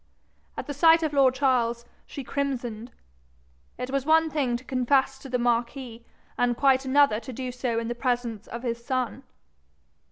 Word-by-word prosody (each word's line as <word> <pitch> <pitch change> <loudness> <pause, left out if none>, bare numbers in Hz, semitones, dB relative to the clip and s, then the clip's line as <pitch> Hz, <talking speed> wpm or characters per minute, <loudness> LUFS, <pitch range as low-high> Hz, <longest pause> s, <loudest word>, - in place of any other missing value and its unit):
At - - -4
the 290 - -5
sight 325 +3 +5
of 305 -2 -1
lord 265 -2 +4
Charles, 240 -3 +1 0.2
she 275 - -7
crimsoned: 245 -4 -3 0.9
it 250 +1 -5
was 275 -1 0
one 320 +2 +3
thing 265 -6 0
to 245 - -15
confess 265 +1 +1
to 270 - -10
the 250 - 0
marquis, 240 0 -2 0.4
and 245 -1 +2
quite 270 -1 +3
another 270 -4 +4
to 260 - -9
do 255 +1 -5
so 245 -2 -2
in 230 0 -2
the 240 - -2
presence 240 -3 -2
of 235 +1 -7
his 235 -1 -3
son. 250 -2 -2
255 Hz, 170 wpm, -26 LUFS, 240-275 Hz, 0.9 s, sight